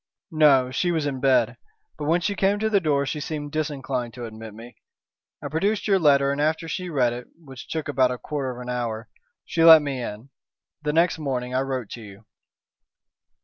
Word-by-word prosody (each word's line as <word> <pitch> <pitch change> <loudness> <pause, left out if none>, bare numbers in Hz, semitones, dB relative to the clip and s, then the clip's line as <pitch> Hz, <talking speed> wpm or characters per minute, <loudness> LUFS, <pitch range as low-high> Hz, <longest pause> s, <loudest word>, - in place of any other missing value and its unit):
"No. 140 -5 +4
She 175 +7 0
was 160 -3 -1
in 135 -2 -3
bed. 125 -4 +2 0.4
But 150 - -6
when 170 +3 +2
she 200 +4 -1
came 195 +1 +1
to 220 +1 -1
the 200 - +4
door 145 -5 +1
she 150 +2 -3
seemed 145 -1 -5
disinclined 135 -6 -3
to 120 -1 -6
admit 110 -1 -9
me. 115 +2 -12 0.7
I - - -3
produced 195 +10 -1
your 195 -2 +3
letter, 140 -3 +4
and 140 +1 -2
after 155 +2 0
she 180 +3 -4
read 125 -6 +1
it, 120 0 -8
which 135 -6 -12
took 160 -2 -4
about 130 -3 +2
a 125 - -3
quarter 140 0 -4
of 125 -1 -7
an 125 0 -7
hour, 115 -2 -4 0.4
she 165 - 0
let 160 -2 +9
me 135 -3 -3
in. 115 +3 -7 0.5
Then 150 0 -2
next 165 0 +2
morning 130 -4 -3
I 130 - +1
wrote 130 -4 -3
to 120 - -7
you." 100 0 -13
140 Hz, 205 wpm, -24 LUFS, 125-160 Hz, 0.7 s, let